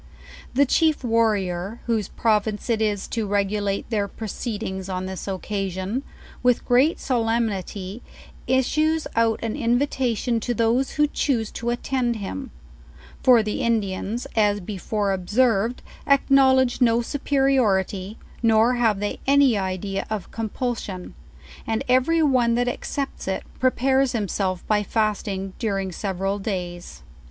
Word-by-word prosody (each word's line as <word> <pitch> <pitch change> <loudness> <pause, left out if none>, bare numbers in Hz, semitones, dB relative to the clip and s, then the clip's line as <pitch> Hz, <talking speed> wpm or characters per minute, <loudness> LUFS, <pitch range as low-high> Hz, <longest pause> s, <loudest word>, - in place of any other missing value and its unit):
The 280 +2 +5
chief 310 +1 +2
warrior, 215 -3 0
whose 225 -4 0
province 215 0 0
it 220 -1 +1
is 205 -3 0
to 225 -3 -2
regulate 200 0 0
their 205 -2 0
proceedings 205 -3 -5
on 185 0 -3
this 190 +1 -6
occasion, 195 +3 -3 0.4
with 250 -1 +2
great 265 +6 +3
solemnity 225 -4 -1 0.5
is 260 0 +3
sues 310 +2 +1
out 225 -1 +2
an 225 -1 -2
invitation 240 -1 0
to 240 +2 -2
those 235 +4 +1
who 300 - +3
choose 250 -6 -1
to 235 - -4
attend 240 0 -1
him; 230 +6 -5 0.7
for 245 -4 +6
the 210 0 -2
Indians, 220 0 -1
as 205 -2 +3
before 200 +1 -2
observed, 220 +4 +1 0.2
acknowledge 265 -2 +4
no 235 -1 +4
superiority, 230 -8 +1 0.2
nor 225 +1 +4
have 225 -5 +2
they 205 - -2
any 275 -3 +5
idea 195 0 -2
of 215 -3 -4
compulsion; 225 -4 -4 0.5
and 225 -1 -1
every 260 +6 +3
one 250 -5 +3
that 245 +1 +1
accepts 270 +1 -4
it, 190 - -2 0.2
prepares 265 +1 +2
himself 195 -4 -2
by 210 -1 +2
fasting 205 -3 -1
during 195 -4 -1
several 195 +2 -2
days. 180 -3 -5
225 Hz, 125 wpm, -23 LUFS, 195-250 Hz, 0.7 s, for